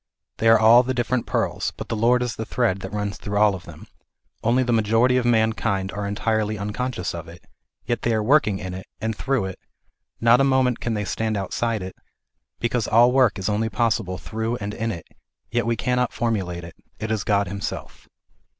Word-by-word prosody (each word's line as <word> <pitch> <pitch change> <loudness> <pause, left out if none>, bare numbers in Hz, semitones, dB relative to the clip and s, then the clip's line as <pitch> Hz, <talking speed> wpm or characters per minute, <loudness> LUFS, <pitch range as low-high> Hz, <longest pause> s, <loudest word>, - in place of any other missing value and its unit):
They 115 - +1
are 115 - +8
all 110 +3 +7
the 130 +1 -2
different 120 0 -1
pearls, - - -1
but - - -7
the - - -1
Lord 120 +3 +3
is 120 -1 -3
the 110 - -4
thread 110 -4 0
that 95 0 -7
runs 105 0 -3
through 100 0 -3
all 105 -1 +5
of 95 - -8
them, - - -11 0.6
only 120 +3 +3
the 120 -1 0
majority 115 +3 +3
of 125 - 0
mankind 110 -4 +1
are 105 0 -4
entirely 110 +1 -1
unconscious 105 -1 -3
of 85 0 -7
it; 85 +1 -13 0.4
yet 120 -2 -1
they 120 - 0
are 110 - 0
working 115 -5 +3
in 95 -1 -6
it, 95 +1 -8
and 110 0 -2
through 130 -3 0
it; 95 -1 -6 0.6
not 120 +3 +5
a - - +4
moment 130 -2 +2
can 115 -2 -2
they 105 -1 -2
stand 110 +1 -1
outside 110 +2 -2
it, 95 - -7 0.6
because 120 -1 0
all 120 +2 +5
work 125 -4 +3
is 95 - -3
only 110 +1 0
possible 105 -3 0
through 110 +6 -3
and 105 -3 -5
in 115 +1 -2
it; 85 -6 -8 0.4
yet 120 0 0
we 115 - +2
cannot 125 +1 0
formulate 95 -7 -2
it, 85 0 -9 0.3
it 110 0 -3
is 110 -2 0
God 100 -1 +1
Himself. 100 +2 -6
110 Hz, 205 wpm, -23 LUFS, 100-120 Hz, 0.6 s, are